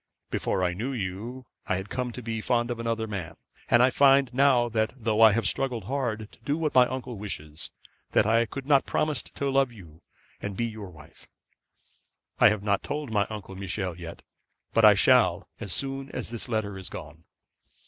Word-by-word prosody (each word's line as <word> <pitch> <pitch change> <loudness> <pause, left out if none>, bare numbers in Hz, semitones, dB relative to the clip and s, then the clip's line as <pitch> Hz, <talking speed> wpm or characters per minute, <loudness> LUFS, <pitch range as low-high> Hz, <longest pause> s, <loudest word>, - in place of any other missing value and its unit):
Before 95 - 0
I 90 -1 +1
knew 120 +9 -3
you 115 +4 -5 0.2
I - - +1
had 95 +2 -5
come 125 -1 -2
to 125 - -8
be 115 -1 -3
fond 120 0 +1
of 120 - -4
another 115 -1 -1
man; 100 -7 -5 0.3
and 120 +1 +6
I 130 - +4
find 135 -1 +4
now, 130 -2 +4
though 110 0 0
I 110 -1 +9
have 115 +2 +1
struggled 125 -5 -1
hard 110 -3 -3
to - - -20
do 140 +6 -1
what 160 -2 -1
my 125 -1 +6
uncle 125 -4 -5
wishes, 75 -7 -5 0.4
that - - +4
I 115 +1 +3
could 135 +3 -7
not 140 -1 +4
promise 150 -4 0
to 140 - -4
love 135 -2 +2
you 85 -8 -14 0.4
and 100 -2 -5
be 120 - 0
your 110 -4 -6
wife. 80 -4 -16 1.1
I - - +8
have 105 -1 -2
not 100 -1 +1
told 145 -6 -4
Uncle 100 -2 -2
Michel 95 -2 -3
yet, 85 -1 -9 0.5
but - - +3
I - - +9
shall - - +4
as 100 - -4
soon 135 +7 -2
as - - -4
this 120 +2 -6
letter 105 -4 -2
is 95 - -7
gone. 75 +3 -10
115 Hz, 190 wpm, -27 LUFS, 100-130 Hz, 1.1 s, I